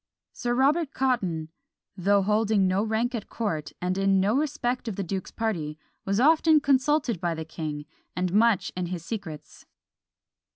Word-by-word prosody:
Sir 240 -1 -2
Robert 285 +4 +2
Cotton, 190 -12 0 0.5
though 200 +1 +2
holding 210 0 +2
no 185 +2 +2
rank 225 +3 0
at 225 -4 -5
court, 160 -10 -3
and 180 +2 -1
in 195 0 +3
no 200 +5 +2
respect 255 -4 -1
of 220 - -3
the 200 - -2
duke's 190 +1 -4
party, 165 -10 -3 0.3
was 195 +2 0
often 315 +3 +5
consulted 275 - +1
by 170 -2 -1
the 160 0 -5
king, 155 -2 -5 0.3
and 180 0 -1
much 220 -1 +3
in 180 -1 -2
his 170 -2 -5
secrets. 165 -8 -7
205 Hz, 160 wpm, -26 LUFS, 180-245 Hz, 0.5 s, often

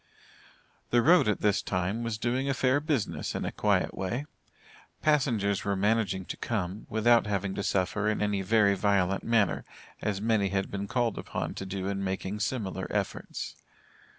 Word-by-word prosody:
The 120 -1 +3
road 175 -3 +6
at 105 - 0
this 105 -1 +2
time, 90 +5 -1
was 115 -2 -2
doing 125 +4 0
a 135 - +1
fair 130 +1 +3
business, 145 - -2
in - - -2
a - - -2
quiet - - +1
way. 115 +9 -3 0.8
Passengers 120 -10 +2
were 100 0 0
managing 100 -2 +1
to - - -6
come, 100 -2 -3
without 115 +1 +4
having 100 -2 -1
to - - -3
suffer 100 +2 0
in 105 - 0
any 105 -1 0
very 100 +1 +4
violent 95 -1 +1
manner, 115 -4 +2 0.4
as 100 -2 -1
many 105 -2 +2
had 95 0 -1
been 100 0 -3
called 120 -1 0
upon - - -4
to 95 - -6
do 95 0 -4
in 100 0 -2
making 95 +2 -3
similar 105 -4 -2
efforts. - - -3
105 Hz, 170 wpm, -29 LUFS, 95-115 Hz, 0.8 s, road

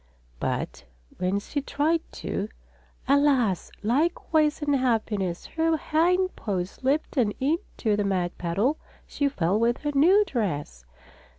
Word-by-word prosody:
But 60 - -3 0.3
when 185 +2 +1
she 285 +8 -3
tried 310 +4 +1
to, - - -3 0.6
alas! 270 -9 +3
Likewise 305 +4 +1
unhappiness. 225 -10 0
Her 325 0 +1
hind 360 +5 +1
paws 185 -3 -3
slipped 280 +3 -1
and 220 -5 +2
into 270 - 0
the 205 - 0
mud 185 -3 -1
puddle 200 - 0 0.3
she 285 -1 0
fell 195 -5 0
with 235 +1 +2
her 295 - 0
new 365 +9 +5
dress. 150 - -3
260 Hz, 120 wpm, -26 LUFS, 200-305 Hz, 0.6 s, new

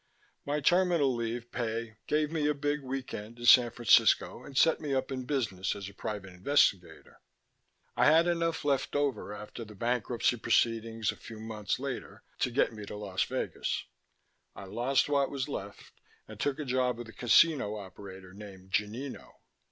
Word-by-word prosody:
My 150 +1 0
terminal 175 -4 +3
leave 120 0 -4
pay 115 -2 -3
gave 150 0 +1
me 155 -3 0
a 150 - +1
big 145 +1 -1
weekend 130 -4 -6
in 120 - -7
San 120 0 +8
Francisco 120 0 +3
and 135 - -8
set 160 +2 +4
me 145 -3 -1
up 130 +1 -1
in 130 -1 -4
business 110 -9 -1
as 100 -1 -6
a 100 - -10
private 95 -3 -6
investigator. 90 - +1 0.7
"I - - +3
had 160 +3 +6
enough 165 -3 0
left 140 -1 0
over 140 -8 -1
after 105 +3 -8
the 105 -1 -12
bankruptcy 120 +2 0
proceedings 115 -1 +1
a - - -12
few 110 -1 -10
months 110 -2 -3
later 135 -1 -6 0.2
to - - +1
get 120 -1 +1
me 105 -1 -8
to - - -6
Las 100 -3 -3
Vegas. - - -3 0.7
I - - -9
lost 120 +8 +1
what 140 -1 +2
was 140 -1 -3
left 100 -8 -7 0.4
and - - -11
took 145 -1 0
a 150 - -4
job 125 -1 +1
with 120 -1 -7
a - - -12
casino 125 -3 +4
operator 95 -1 -10
named 95 -2 -12
Gonino. 115 +8 -3
120 Hz, 170 wpm, -30 LUFS, 105-140 Hz, 0.7 s, San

